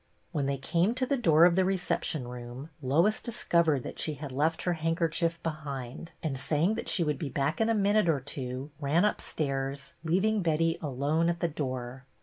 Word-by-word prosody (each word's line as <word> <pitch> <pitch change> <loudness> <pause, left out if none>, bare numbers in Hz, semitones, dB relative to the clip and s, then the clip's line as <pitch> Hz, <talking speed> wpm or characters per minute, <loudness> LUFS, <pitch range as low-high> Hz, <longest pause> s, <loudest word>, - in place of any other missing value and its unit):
When 145 -5 -1
they 140 0 0
came 170 - +1
to 255 0 +1
the 280 - +1
door 165 - +5
of 175 -1 +5
the 190 - +4
recep 185 -2 0
tion 135 -6 -3
room, 125 +4 -8
Lois 165 +11 +2
discovered 170 - +1
that - - -7
she 155 - -1
had 145 0 -7
left 155 +5 0
her 180 - +1
handkerchief 165 +1 0
behind 145 -3 -5
and, 140 -5 -2
saying 155 +8 +1
that - - -3
she 175 - +3
would 150 -2 -1
be 155 -5 -3
back 140 +8 -1
in 225 - +3
a 225 - +3
minute 205 -2 +3
or 150 -4 +3
two, 130 +1 -5
ran 155 +6 +2
upstairs, 140 -8 -2
leaving 195 +6 +2
Betty 165 0 +1
alone 150 +4 +1
at 170 0 -1
the 170 - +1
door. 130 -4 -4
155 Hz, 195 wpm, -29 LUFS, 140-170 Hz, -, door